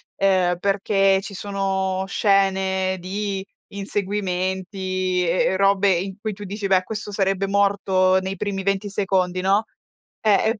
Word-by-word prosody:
ehm, 185 Hz, -3 st, +2 dB
perché 195 Hz, 0 st, +2 dB
ci 200 Hz, 0 st, -8 dB
sono 190 Hz, -1 st, -1 dB
scene 190 Hz, -2 st, +1 dB
di 195 Hz, +1 st, -3 dB, 0.2 s
inseguimenti 185 Hz, -2 st, -2 dB
e 175 Hz, +2 st, +2 dB
e -, -, 0 dB
robe 195 Hz, 0 st, +3 dB
in 190 Hz, +3 st, -3 dB
cui 215 Hz, -1 st, -3 dB
tu 205 Hz, +1 st, -9 dB
dici: 200 Hz, +1 st, -4 dB
"Beh, 185 Hz, -1 st, +3 dB
questo 210 Hz, 0 st, -6 dB
sarebbe 195 Hz, -1 st, 0 dB
morto 195 Hz, -2 st, +2 dB
nei 190 Hz, +1 st, -4 dB
primi 195 Hz, -1 st, -3 dB
20 195 Hz, +1 st, -1 dB
secondi", 185 Hz, -2 st, 0 dB
no. 200 Hz, +3 st, +2 dB, 0.6 s
Eh, 215 Hz, -2 st, +4 dB, 0.2 s
e 225 Hz, -2 st, -2 dB
195 Hz, 140 wpm, -22 LUFS, 185-200 Hz, 0.6 s, Eh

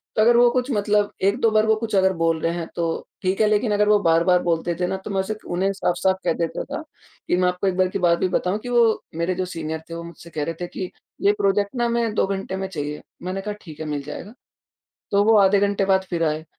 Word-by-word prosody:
तो 215 Hz, -, +3 dB
अगर 235 Hz, +2 st, +5 dB
वो 240 Hz, 0 st, +6 dB
कुछ 255 Hz, +1 st, -1 dB
मतलब 205 Hz, -1 st, +1 dB
1-2 225 Hz, +4 st, +3 dB
बार 215 Hz, 0 st, +3 dB
वो 220 Hz, 0 st, +4 dB
कुछ 220 Hz, -2 st, -3 dB
अगर 190 Hz, 0 st, +4 dB
बोल 165 Hz, -1 st, +1 dB
रहे 165 Hz, +1 st, 0 dB
हैं, 170 Hz, -2 st, -4 dB
तो 165 Hz, -1 st, -2 dB, 0.2 s
ठीक 190 Hz, +3 st, 0 dB
है, 215 Hz, -, +5 dB
लेकिन 210 Hz, +1 st, +2 dB
अगर 210 Hz, 0 st, +2 dB
वो 210 Hz, -1 st, +5 dB
बार-बार 170 Hz, +2 st, +4 dB
बोलते 170 Hz, 0 st, 0 dB
थे 180 Hz, -, +1 dB
ना, 190 Hz, -, -2 dB
तो 190 Hz, -, -9 dB
मैं 195 Hz, -, 0 dB
उसे 205 Hz, +3 st, -3 dB
क 215 Hz, -, -13 dB
उन्हें 190 Hz, +3 st, +1 dB
साफ-साफ 190 Hz, 0 st, +1 dB
कह 170 Hz, -, +3 dB
देता 165 Hz, -1 st, -2 dB
था, 285 Hz, +3 st, -5 dB, 0.5 s
कि -, -, +2 dB
मैं 180 Hz, 0 st, +3 dB
आपको 180 Hz, +2 st, -1 dB
एक 185 Hz, -1 st, 0 dB
बार 185 Hz, 0 st, +3 dB
की 195 Hz, -, -3 dB
बात 170 Hz, -1 st, +3 dB
भी 185 Hz, -, +2 dB
बताऊँ 185 Hz, +3 st, 0 dB
कि 245 Hz, -, -7 dB
वो 235 Hz, -2 st, +3 dB
मेरे 170 Hz, +2 st, -1 dB
जो 185 Hz, 0 st, -1 dB
सीनियर 160 Hz, -3 st, -4 dB
थे, -, -, -6 dB
वो 170 Hz, -, -6 dB
मुझसे 170 Hz, 0 st, -11 dB
कह 155 Hz, -2 st, -3 dB
रहे 165 Hz, -, -2 dB
थे 175 Hz, -, -2 dB
कि, 180 Hz, +1 st, -5 dB, 0.3 s
"ये 200 Hz, -, +5 dB
प्रोजेक्ट 200 Hz, +2 st, 0 dB
ना 240 Hz, -1 st, +1 dB
हमें 235 Hz, -2 st, 0 dB
2 -, -, +3 dB
घंटे 195 Hz, -1 st, -3 dB
में 190 Hz, 0 st, -3 dB
चाहिए।" 150 Hz, -4 st, -5 dB, 0.2 s
मैंने 185 Hz, +1 st, -3 dB
कहा, 210 Hz, +1 st, -4 dB
"ठीक 155 Hz, -4 st, -12 dB
है, 155 Hz, -, -4 dB
मिल 145 Hz, -2 st, -3 dB
जाएगा।" 185 Hz, -, -8 dB, 0.8 s
तो 200 Hz, 0 st, +4 dB
वो 220 Hz, +1 st, +5 dB
आधे 195 Hz, 0 st, +5 dB
घंटे 200 Hz, -1 st, +1 dB
बाद 190 Hz, -1 st, +3 dB
फिर 170 Hz, -2 st, -1 dB
आए, 155 Hz, 0 st, 0 dB
190 Hz, 270 wpm, -23 LUFS, 170-210 Hz, 0.8 s, वो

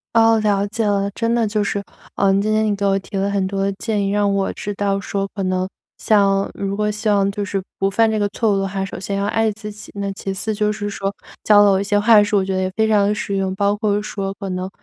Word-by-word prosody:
哦， 225 Hz, 0 st, +5 dB
了 205 Hz, -1 st, +1 dB
解 220 Hz, +1 st, -2 dB
了， 200 Hz, -1 st, +1 dB
真 230 Hz, +3 st, -1 dB
的 230 Hz, -2 st, +2 dB
就 210 Hz, 0 st, 0 dB
是， 200 Hz, 0 st, -2 dB, 0.3 s
嗯， 195 Hz, 0 st, +3 dB
今 215 Hz, +1 st, 0 dB
天 215 Hz, 0 st, +2 dB
你 210 Hz, -1 st, +1 dB
给 200 Hz, 0 st, -2 dB
我 195 Hz, 0 st, +2 dB
提 195 Hz, -, -10 dB
了 195 Hz, +1 st, 0 dB
很 195 Hz, -2 st, 0 dB
多 195 Hz, 0 st, -1 dB
建 205 Hz, 0 st, -2 dB
议， -, -, 0 dB
让 205 Hz, -1 st, +2 dB
我 195 Hz, -1 st, 0 dB
知 205 Hz, -, -5 dB
道 200 Hz, 0 st, 0 dB
说 195 Hz, 0 st, -2 dB
可 200 Hz, -, -4 dB
能 185 Hz, 0 st, 0 dB, 0.3 s
像 200 Hz, -2 st, +2 dB
如 195 Hz, 0 st, -3 dB
果 210 Hz, 0 st, 0 dB
希 210 Hz, +1 st, -4 dB
望 200 Hz, -1 st, +3 dB
就 205 Hz, 0 st, -3 dB
是 195 Hz, -1 st, -3 dB, 0.2 s
不 195 Hz, -, +2 dB
犯 225 Hz, +2 st, +2 dB
这 215 Hz, -, 0 dB
个 205 Hz, -, +1 dB
错 225 Hz, -3 st, +1 dB
误 195 Hz, -, +1 dB
的 195 Hz, -, -1 dB
话， 195 Hz, 0 st, -3 dB
首 195 Hz, -, -6 dB
先 195 Hz, +1 st, -3 dB
要 200 Hz, 0 st, -1 dB
爱 225 Hz, +1 st, +1 dB
自 210 Hz, 0 st, -8 dB
己。 210 Hz, -, -12 dB
那 200 Hz, -1 st, -3 dB
其 195 Hz, 0 st, -5 dB
次 220 Hz, +3 st, -3 dB
就 210 Hz, 0 st, 0 dB
是 205 Hz, 0 st, -4 dB
说， 195 Hz, -1 st, -3 dB, 0.4 s
教 205 Hz, -1 st, +7 dB
了 205 Hz, -, +5 dB
我 190 Hz, -, +2 dB
一 -, -, -1 dB
些 205 Hz, +1 st, +1 dB
话 210 Hz, 0 st, +6 dB
术， 205 Hz, 0 st, 0 dB
我 190 Hz, -, 0 dB
觉 190 Hz, -, -2 dB
得 190 Hz, -, 0 dB
也 185 Hz, -, -1 dB
非 220 Hz, 0 st, +2 dB
常 205 Hz, -2 st, +3 dB
地 210 Hz, -, +1 dB
实 200 Hz, -1 st, -3 dB
用， 190 Hz, -1 st, -1 dB
包 200 Hz, 0 st, +2 dB
括 210 Hz, -1 st, 0 dB
说 195 Hz, -2 st, -4 dB
可 195 Hz, -1 st, -7 dB
能， 185 Hz, +1 st, -3 dB
200 Hz, 305 characters per minute, -20 LUFS, 195-210 Hz, 0.4 s, 教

